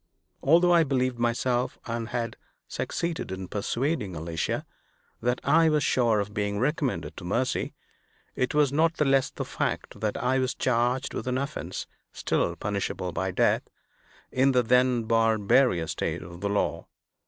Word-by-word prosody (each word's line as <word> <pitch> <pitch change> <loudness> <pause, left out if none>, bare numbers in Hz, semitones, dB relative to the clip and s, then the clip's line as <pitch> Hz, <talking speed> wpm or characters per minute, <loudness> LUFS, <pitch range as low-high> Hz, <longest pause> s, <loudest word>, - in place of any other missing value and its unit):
Although 175 +5 +5
I 170 -1 +6
believed 130 -4 0
myself, 120 +1 0
and 115 0 -3
had 115 -2 -2 0.3
succeeded 170 - -3
in 95 0 -5
persuading 110 - -2
Alicia, 80 +1 -2 0.6
that 125 +2 0
I 160 +4 +5
was 150 -1 +2
sure 115 -4 +3
of 100 0 -3
being 105 0 -1
recommended 125 - -1
to - - -8
mercy, 120 +9 -1 0.6
it 130 +3 -1
was 145 -2 +3
not 165 +2 +3
the 150 - +1
less 135 -1 +3
the - - -5
fact - - -3
that 105 -1 -1
I 130 +2 +1
was 130 0 0
charged 125 +2 0
with - - -4
an 125 0 0
offense 140 +3 -4 0.3
still - - 0
punishable 100 -3 -3
by 95 +2 -2
death, 95 - +1 0.6
in 135 +1 +3
the 125 -1 +4
then 125 0 +3
barbarous 110 -4 +3
state - - -3
of 85 +1 -11
the 100 - -1
law. 100 - -1
125 Hz, 155 wpm, -27 LUFS, 105-135 Hz, 0.6 s, I